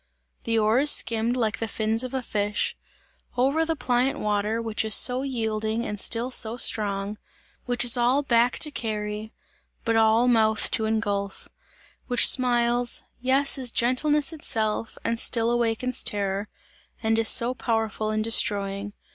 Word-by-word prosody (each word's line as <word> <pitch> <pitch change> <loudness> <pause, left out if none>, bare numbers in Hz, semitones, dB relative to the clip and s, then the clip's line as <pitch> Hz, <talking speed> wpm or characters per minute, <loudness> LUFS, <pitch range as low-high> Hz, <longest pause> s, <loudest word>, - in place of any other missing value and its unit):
The 230 0 0
oars 225 +7 +2
skimmed 230 -1 +2
like 220 -3 -1
the 225 - -3
fins 220 +2 -1
of 255 +1 -6
a 260 - -3
fish, 205 -2 -1 0.6
over 275 +6 +2
the 325 0 -2
pliant 255 -1 0
water, 210 +1 -1
which 225 -2 -2
is 220 -1 +2
so 250 0 +4
yielding 220 -3 -2
and 210 -1 -5
still 240 +2 0
so 230 -1 +1
strong; 205 -2 -1 0.5
which 245 0 +1
is 240 0 +5
all 250 +4 +2
back 240 -2 +2
to 300 - +2
carry, 215 -2 -5 0.5
but 230 -1 +1
all 225 +2 +3
mouth 220 -3 +2
to 220 - -1
engulph; 205 -3 -3 0.6
which 245 -2 +4
smiles 240 -1 +1 0.2
yes, 270 +2 +1
is 255 -2 -2
gentleness 280 +6 +1
itself, 220 -7 -2
and 230 0 -2
still 230 -1 0
awakens 240 +1 0
terror 200 0 -2 0.5
and 225 0 +1
is 225 - +1
so 240 +2 +3
powerful 225 -3 -2
in 215 0 -1
destroying. 205 -2 0
230 Hz, 150 wpm, -24 LUFS, 215-245 Hz, 0.6 s, is